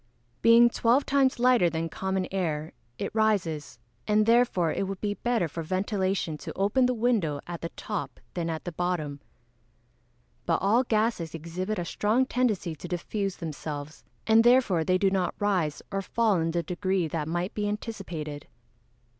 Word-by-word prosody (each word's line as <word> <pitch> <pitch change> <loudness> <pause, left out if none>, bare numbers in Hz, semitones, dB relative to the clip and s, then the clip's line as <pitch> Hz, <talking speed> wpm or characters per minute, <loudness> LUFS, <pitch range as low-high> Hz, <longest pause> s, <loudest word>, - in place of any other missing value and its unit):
_ - - -42 0.4
Being 230 +1 +7
twelve 240 +5 +2
times 275 -2 +2
lighter 245 -7 +4
than 165 0 -2
common 190 +1 -2
air 160 -5 -2 0.2
it - - -4
rises, 175 - 0 0.3
and 215 0 +3
therefore 230 -8 +3
it 195 - -1
would 195 -1 -5
be 205 -1 -1
better 230 -4 0
for 165 +2 -6
ventilation 185 -2 -1
to - - -6
open 205 +7 +3
the 250 - 0
window 215 -11 +1
at 175 -1 -6
the 165 - -4
top 210 -4 -4
than 170 -2 -2
at 160 -1 -4
the 175 - -3
bottom. 160 -4 -2 1.3
But 165 - +3
all 220 +6 +3
gases 215 -8 0
exhibit 180 +6 -4
a 175 - -2
strong 220 +8 +1
tendency 220 -10 0
to 175 - -8
diffuse 195 +3 -3
themselves, 150 -2 -6 0.2
and 225 +1 +5
therefore 240 -9 +4
they 185 +3 +2
do 195 0 +2
not 185 -2 0
rise 185 -8 0
or 195 0 -1
fall 215 +1 +1
in 165 0 0
the 170 +1 -1
degree 185 +1 -1
that 155 -1 -3
might 175 +3 -2
be 205 -1 -1
anticipated. 180 -9 -5
190 Hz, 170 wpm, -27 LUFS, 165-220 Hz, 1.3 s, Being